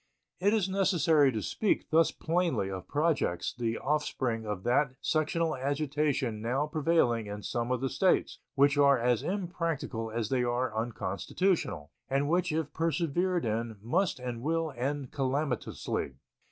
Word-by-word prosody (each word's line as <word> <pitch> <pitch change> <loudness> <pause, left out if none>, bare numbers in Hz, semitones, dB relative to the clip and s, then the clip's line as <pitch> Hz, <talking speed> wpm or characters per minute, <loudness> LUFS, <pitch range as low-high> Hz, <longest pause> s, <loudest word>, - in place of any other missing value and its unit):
It 200 +3 +3
is 215 -4 +2
necessary 170 -7 +3
to 110 -3 -3
speak 215 - 0
thus 160 0 +5
plainly 165 - 0
of 95 -1 -6
projects 145 - 0
the 115 -2 -2
offspring 130 -6 -1
of 105 -3 -3
that 125 +2 +2
sectional 160 +1 0
agitation 140 -4 -1
now 125 +6 0
prevailing 150 -8 +1
in 105 0 -6
some 120 -1 -2
of 125 -1 0
the 135 - +1
States, 190 -2 +2 0.2
which 140 +1 +4
are 140 -1 +6
as 120 -1 +1
impracticable 165 - -3
as 110 -1 -2
they 130 -2 +1
are 120 -1 -1
unconstitutional, 110 - -1 0.2
and 140 +1 +1
which 175 +2 +1
if 155 -1 -2
persevered 170 +1 0
in 110 0 -2
must 160 - 0
and 125 -2 -5
will 160 +1 -1
end 135 +2 -3
calamitously. 135 - -2
140 Hz, 145 wpm, -30 LUFS, 115-165 Hz, 0.2 s, are